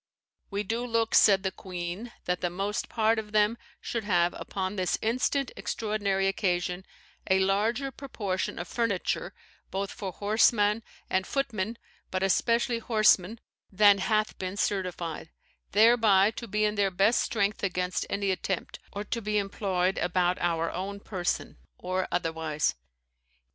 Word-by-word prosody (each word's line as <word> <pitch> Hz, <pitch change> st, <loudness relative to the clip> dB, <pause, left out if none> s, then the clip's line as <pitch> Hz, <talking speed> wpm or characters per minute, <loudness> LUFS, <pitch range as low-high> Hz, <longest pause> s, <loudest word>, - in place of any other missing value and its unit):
We 200 Hz, 0 st, -2 dB
do 230 Hz, +4 st, -2 dB
look," 230 Hz, -2 st, 0 dB
said 195 Hz, -2 st, +6 dB
the 190 Hz, -, 0 dB
queen, 185 Hz, +5 st, -6 dB
"that 180 Hz, 0 st, -1 dB
the 175 Hz, -, 0 dB
most 195 Hz, +4 st, -3 dB
part 225 Hz, 0 st, +2 dB
of 210 Hz, -1 st, -8 dB
them 210 Hz, +1 st, +3 dB, 0.2 s
should 230 Hz, -2 st, -3 dB
have, 175 Hz, -4 st, +2 dB
upon 190 Hz, +1 st, -4 dB
this 185 Hz, -2 st, 0 dB
instant 250 Hz, +4 st, 0 dB
extraordinary 205 Hz, -3 st, -1 dB
occasion, 180 Hz, -1 st, -1 dB, 0.4 s
a 190 Hz, -, +5 dB
larger 215 Hz, +8 st, +1 dB
proportion 205 Hz, -10 st, -3 dB
of 175 Hz, -, -5 dB
furniture, 230 Hz, -4 st, -1 dB, 0.3 s
both 195 Hz, +1 st, -3 dB
for 200 Hz, -5 st, -5 dB
horseman 210 Hz, +2 st, +3 dB, 0.3 s
and 185 Hz, 0 st, 0 dB
footmen, 230 Hz, -5 st, -2 dB, 0.3 s
but 185 Hz, 0 st, -1 dB
especially 230 Hz, +5 st, +2 dB
horsemen, 215 Hz, -2 st, +3 dB, 0.3 s
than 205 Hz, 0 st, +6 dB
hath 215 Hz, +1 st, 0 dB
been 185 Hz, +1 st, -4 dB
certified; 180 Hz, -5 st, -2 dB, 0.4 s
thereby 215 Hz, -2 st, +5 dB
to 235 Hz, +1 st, -7 dB
be 210 Hz, +1 st, +1 dB
in 210 Hz, -, +1 dB
their 200 Hz, -2 st, +2 dB
best 195 Hz, +5 st, +3 dB
strength 205 Hz, -2 st, 0 dB
against 180 Hz, -2 st, -1 dB
any 200 Hz, -1 st, 0 dB
attempt, 190 Hz, 0 st, -3 dB
or 205 Hz, -, -4 dB
to 230 Hz, +2 st, -3 dB
be 210 Hz, 0 st, 0 dB
employed 195 Hz, -2 st, 0 dB
about 180 Hz, 0 st, +1 dB
our 165 Hz, -1 st, 0 dB
own 195 Hz, +3 st, -4 dB
person, 185 Hz, -3 st, -3 dB, 0.2 s
or 185 Hz, +1 st, -2 dB
otherwise. 160 Hz, -3 st, 0 dB
200 Hz, 145 wpm, -28 LUFS, 185-220 Hz, 0.4 s, said